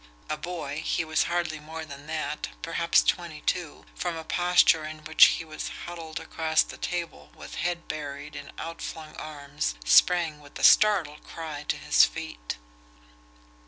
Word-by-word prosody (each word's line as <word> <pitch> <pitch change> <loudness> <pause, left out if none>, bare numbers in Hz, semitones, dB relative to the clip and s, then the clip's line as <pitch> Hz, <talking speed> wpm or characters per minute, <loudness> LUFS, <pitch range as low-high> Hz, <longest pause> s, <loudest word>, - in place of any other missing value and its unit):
A - - +1
boy, 155 -2 -5
he 165 - 0
was 155 0 +1
hardly 170 -3 -1
more 160 +1 -7
than 140 -1 -11
that, 155 -1 -3
perhaps 170 +1 +3
twenty 170 -4 -1
two, 175 -4 -2
from 175 -2 -3
a 160 - -6
posture 175 -1 +4
in 155 0 -7
which 155 +1 +8
he 165 - +1
was 155 - -5 0.2
huddled 165 -1 -6
across 160 -1 +1
the - - -10
table 175 -2 -4
with - - -10
head 175 0 -2
buried 145 -1 -6
in - - -8
out 165 0 -6
flung 155 -1 -7
arms, 145 - -4
sprang 165 - +5
with 145 -1 -12
a - - -6
startled 180 -9 +5
cry 155 -3 -7
to - - 0
his - - +5
feet. - - -2
160 Hz, 160 wpm, -27 LUFS, 150-170 Hz, 0.2 s, which